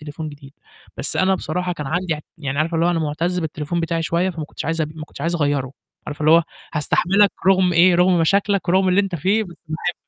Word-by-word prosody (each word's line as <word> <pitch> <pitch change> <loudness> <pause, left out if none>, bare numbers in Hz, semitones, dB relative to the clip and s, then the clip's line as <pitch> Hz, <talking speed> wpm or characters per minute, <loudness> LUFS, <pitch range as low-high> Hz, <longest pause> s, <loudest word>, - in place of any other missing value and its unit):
تليفون 155 +1 -7
جديد، 140 -2 -13 0.4
بس - - 0
أنا 190 +1 +3
بصراحة 180 -1 -3
كان 150 -4 -6
عندي 170 +2 -1
أع 150 - -8 0.2
يعني 140 -2 -3
عارفة 165 +2 0
اللي 165 +1 +2
هو 175 - +3
أنا 165 - 0
مُعتَز 165 +4 -1
بالتليفون 160 +1 -3
بتاعي 165 0 -1
شوية، 170 +3 0
فما 160 -3 -6
كنتش - - -8
عايز 160 +2 -1
أبي 155 0 -3
ما 155 -1 -7
كنتش - - -14
عايز 170 +1 -1
أغيّره، 145 -4 0 0.3
عارفة 150 0 -7
اللي 155 - +3
هو 165 +1 +7 0.3
هاستحملك 195 +7 +3 0.2
رُغم 185 -1 +4
إيه، 175 +2 +5
رغُم 180 0 +4
مشاكلك 195 +3 +1
ورُغم 190 +1 +3
اللي 185 +2 +4
أنت 195 -3 -3
فيه، 195 +7 +1
بس 175 -3 -12
باحبك. 170 +2 -2
170 Hz, 230 wpm, -21 LUFS, 155-180 Hz, 0.4 s, هو